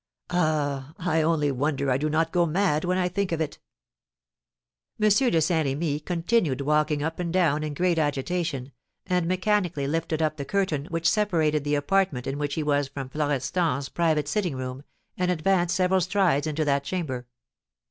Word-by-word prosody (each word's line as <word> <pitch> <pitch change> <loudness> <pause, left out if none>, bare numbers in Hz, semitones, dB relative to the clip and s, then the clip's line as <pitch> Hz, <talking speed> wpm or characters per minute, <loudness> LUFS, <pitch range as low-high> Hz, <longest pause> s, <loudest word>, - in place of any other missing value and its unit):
Ah, 150 -4 0
I 165 -2 +1
only 155 -2 +2
wonder 140 0 0
I 125 - +3
do 150 +2 -1
not 160 +2 +1
go 175 -1 +2
mad 160 -2 +1
when 180 +1 +1
I 180 -1 +1
think 195 +1 -2
of 165 - -1
it!" 155 -2 -3 1.4
M. 215 - +3
de 210 -4 +3
Saint 160 -1 +1
Remy 145 +2 -1
continued 170 - 0
walking 150 +1 +1
up 160 +2 -3
and 175 -2 -2
down 165 -5 +2
in 150 -1 -4
great 175 +1 +1
agitation, 145 -1 -2 0.3
and 180 -2 0
mechanically 185 -5 0
lifted 160 +2 -1
up 155 -1 0
the 140 - -3
curtain 155 -3 -1
which 165 0 -1
separated 165 -7 +2
the 145 0 0
apartment 145 -3 +1
in 135 +2 -3
which 145 -1 -2
he 160 - -1
was 145 -1 +1
from 135 -1 -7
Florestan's 145 0 -1
private 160 -4 +1
sitting 175 -2 -1
room, 130 0 -5 0.4
and 180 0 +1
advanced 175 +1 +1
several 185 0 +2
strides 180 -6 +2
into 155 0 -1
that 140 -1 +1
chamber. 140 -8 -4
155 Hz, 175 wpm, -26 LUFS, 145-180 Hz, 1.4 s, I